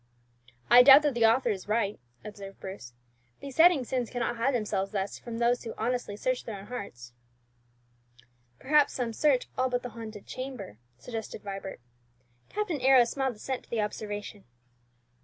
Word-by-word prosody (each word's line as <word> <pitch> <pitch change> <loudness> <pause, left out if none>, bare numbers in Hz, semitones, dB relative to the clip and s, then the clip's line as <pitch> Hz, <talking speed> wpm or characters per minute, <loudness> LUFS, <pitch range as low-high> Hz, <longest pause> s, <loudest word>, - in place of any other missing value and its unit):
'" 120 0 -30
"I - - +12
doubt 275 +3 +9
that 295 -2 +1
the 230 -2 +4
author 235 +4 +3
is 195 -2 -5
right," 210 -1 0 0.3
observed 200 -2 -9
Bruce. 190 -11 -9 0.5
"Besetting 305 +2 +4
sins 250 -1 -2
cannot 240 -1 -2
hide 250 +3 +1
themselves 200 -4 -1
thus 195 -1 -3
from 235 -1 -7
those 240 +1 +1
who 230 - -6
honestly 235 -2 -2
search 255 +2 -1
their 215 -3 -6
own 195 - -10
hearts." 120 - -8 1.4
"Perhaps 295 +1 +3
some 240 -3 -2
search 270 +1 +2
all 260 0 +2
but 245 0 -1
the 245 - -5
haunted 220 -3 -9
chamber," 255 - -7 0.2
suggested 225 - -7
Vibert. 195 -7 -7 0.7
Captain 365 -9 -2
Arrows 255 -2 +5
smiled 265 -3 -1
assent 255 +4 -5
to - - -31
the 230 -2 0
observation. 205 -1 -5
230 Hz, 160 wpm, -28 LUFS, 205-255 Hz, 1.4 s, I